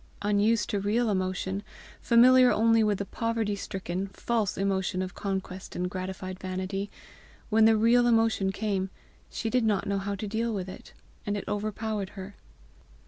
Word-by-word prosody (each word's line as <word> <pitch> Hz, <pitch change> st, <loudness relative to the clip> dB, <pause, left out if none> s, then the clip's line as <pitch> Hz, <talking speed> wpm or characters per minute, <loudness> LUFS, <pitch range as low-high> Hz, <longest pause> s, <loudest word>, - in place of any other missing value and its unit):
Unused 210 Hz, +2 st, +2 dB
to 205 Hz, -, 0 dB
real 215 Hz, +3 st, +1 dB
emotion, 190 Hz, 0 st, -1 dB, 0.4 s
familiar 250 Hz, +1 st, +6 dB
only 225 Hz, 0 st, +4 dB
with 210 Hz, -2 st, +2 dB
the 200 Hz, -, -3 dB
poverty 230 Hz, -1 st, -1 dB
stricken, 190 Hz, -1 st, -4 dB
false 220 Hz, +1 st, -1 dB
emotion 190 Hz, -1 st, 0 dB
of 185 Hz, +1 st, -6 dB
conquest 190 Hz, -1 st, -5 dB
and 180 Hz, 0 st, -2 dB
gratified 185 Hz, 0 st, -5 dB
vanity, 190 Hz, +2 st, -3 dB, 0.6 s
when 220 Hz, +1 st, +5 dB
the 220 Hz, 0 st, +5 dB
real 240 Hz, +2 st, +4 dB
emotion 225 Hz, -4 st, +2 dB
came 195 Hz, -2 st, -2 dB, 0.4 s
she 225 Hz, -, -4 dB
did 245 Hz, +1 st, +2 dB
not 210 Hz, -3 st, +1 dB
know 200 Hz, 0 st, 0 dB
how 200 Hz, +1 st, -3 dB
to 200 Hz, -, -5 dB
deal 225 Hz, +2 st, -1 dB
with 190 Hz, -2 st, -3 dB
it, 185 Hz, -, -11 dB, 0.3 s
and 205 Hz, 0 st, -2 dB
it -, -, -5 dB
overpowered 210 Hz, -1 st, -2 dB
her. 195 Hz, +1 st, -8 dB
205 Hz, 160 wpm, -28 LUFS, 190-225 Hz, 0.6 s, familiar